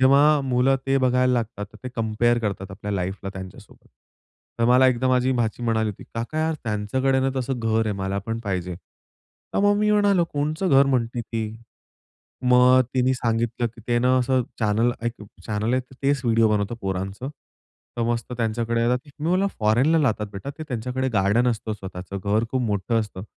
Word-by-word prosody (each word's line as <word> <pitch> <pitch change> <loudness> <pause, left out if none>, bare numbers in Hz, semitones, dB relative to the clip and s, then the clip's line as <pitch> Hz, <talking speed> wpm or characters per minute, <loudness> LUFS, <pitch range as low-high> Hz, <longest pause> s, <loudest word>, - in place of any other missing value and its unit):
जेव्हा 140 +3 +5
मुलं 130 0 +2
ते 135 - +2
बघायला 125 0 +2
लागतात, 115 -4 -2
तर - - -13
ते - - -3
कंपेअर 115 +1 +1
करतात 100 -3 -3
आपल्या 105 +1 -5
लाईफला 95 +1 -3
त्यांच्यासोबत. 95 -1 -11 0.7
तर 115 - +2
मला 125 +2 +6
एकदा 130 0 +2
माझी 130 0 +2
भाची 120 -1 -1
म्हणाली 110 -2 +1
होती, 100 - -11
"काका 120 +7 -3
यार! 160 0 +1
त्यांच्याकडे 125 +5 0
ना 135 0 +1
तसं 130 0 -2
घर 115 -1 +1
आहे, 105 - 0
मला 95 +1 -2
पण 115 0 -2
पाहिजे". 90 -3 -2
तर 85 - -11
मग 205 0 +4
मी 210 0 +2
म्हणालो, 205 -4 +3
"कोणतं 155 +6 -1
घर 135 0 +6
म्हणते 120 -3 0
ती?" 115 -1 -3 1.1
मग 125 +1 +6
तिने 130 0 +3
सांगितलं, 120 0 -1
"की 115 0 -10
ते 120 0 +3
ना 125 +1 +3
असं 130 0 +2 0.2
चॅनेल 110 +3 +2
एक 120 - 0 0.3
चॅनेल 110 +2 -1
आहे, 130 - +2 0.2
तेच 140 0 +2
व्हिडिओ 115 -1 +4
बनवतं 105 +1 0
पोरांचं, 95 +5 -4 0.7
तर 120 - 0
मस्त 120 +1 -3
त्यांच्याकडे 115 0 0
येतात" 125 +2 +2 0.2
मी 155 - -2
बोललो, 185 +3 +2
"फोरेनला 120 +9 +3
राहतात 110 -5 0
बेटा 100 +8 -6
ते, - - -5
त्यांच्याकडे 125 +1 -2
गार्डन 105 +5 +3
असतं 110 -2 -2
स्वतःचं, 95 -2 -7
घर 105 +3 +2
खूप 130 - 0
मोठं 115 +1 0
असतं, 100 -3 -6
120 Hz, 180 wpm, -24 LUFS, 105-130 Hz, 1.1 s, मला